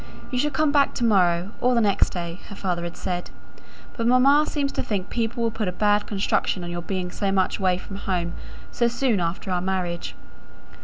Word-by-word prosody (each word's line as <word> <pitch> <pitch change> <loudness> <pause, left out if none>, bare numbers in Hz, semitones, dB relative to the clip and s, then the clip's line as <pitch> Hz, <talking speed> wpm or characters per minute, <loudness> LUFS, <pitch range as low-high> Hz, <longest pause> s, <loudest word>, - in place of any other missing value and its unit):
"You 250 - 0
shall 295 +3 +2
come 300 +1 +1
back 285 -1 +3
to - - -2
morrow, 180 -3 +3
or 250 0 +3
the - - +4
next 205 -2 +3
day," 170 0 -5
her 200 - -8
father 180 -3 -2
had 175 - -6
said. 175 -1 -3 0.7
"But 230 -1 -1
mamma 275 +5 +5
seems 280 -2 -1
to - - -2
think 200 -3 -3
people 235 0 -1
will 230 - +1
put 220 -2 -2
a - - 0
bad 205 +2 +2
construction 195 -2 0
on 175 - -5
your 175 0 -3
being 180 0 -3
so 195 +1 -1
much 190 +1 +1
away 185 -2 +2
from 195 +2 -8
home 175 -3 -2 0.4
so 235 - +2
soon 240 -3 +1
after 175 +3 -2
our 180 -1 +1
marriage." 180 -2 -2
195 Hz, 210 wpm, -24 LUFS, 180-235 Hz, 0.7 s, mamma